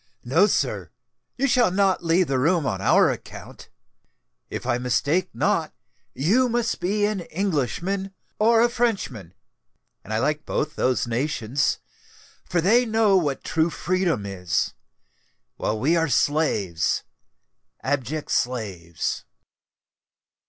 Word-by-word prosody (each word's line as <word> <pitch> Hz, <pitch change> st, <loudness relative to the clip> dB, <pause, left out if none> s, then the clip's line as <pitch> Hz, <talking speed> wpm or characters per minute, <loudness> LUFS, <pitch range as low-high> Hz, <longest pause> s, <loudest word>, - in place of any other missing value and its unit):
"No, -, -, +4 dB
sir—you 270 Hz, -, -3 dB
shall 245 Hz, -5 st, +4 dB
not 190 Hz, -1 st, +1 dB
leave 170 Hz, +2 st, +3 dB
the 135 Hz, -4 st, 0 dB
room 165 Hz, +3 st, +2 dB
on 95 Hz, -7 st, -2 dB
our -, -, +4 dB
account. -, -, -10 dB, 0.8 s
If -, -, -5 dB
I 120 Hz, -, 0 dB
mistake 140 Hz, +9 st, +1 dB
not, -, -, 0 dB, 0.4 s
you 225 Hz, -, +2 dB
must 235 Hz, -1 st, -1 dB
be 205 Hz, +3 st, +1 dB
an 210 Hz, -1 st, -1 dB
Englishman 190 Hz, -, -2 dB, 0.3 s
or 225 Hz, +1 st, +5 dB
a 240 Hz, -, +4 dB
Frenchman; 190 Hz, -, -2 dB, 0.7 s
and 105 Hz, -, -10 dB
I 110 Hz, -, +1 dB
like 150 Hz, +5 st, 0 dB
both 150 Hz, +1 st, -2 dB
those 130 Hz, 0 st, +1 dB
nations—for 135 Hz, +6 st, -3 dB
they 225 Hz, +8 st, +4 dB
know 220 Hz, -3 st, +3 dB
what 145 Hz, -7 st, 0 dB
true 160 Hz, +1 st, +1 dB
freedom 175 Hz, -, -1 dB
is, 90 Hz, -4 st, -1 dB, 0.8 s
while 110 Hz, 0 st, -1 dB
we 150 Hz, +9 st, +2 dB
are 165 Hz, -2 st, +1 dB
slaves,—abject 140 Hz, -, -2 dB
slaves." 100 Hz, -10 st, -2 dB
155 Hz, 115 wpm, -24 LUFS, 125-195 Hz, 0.8 s, or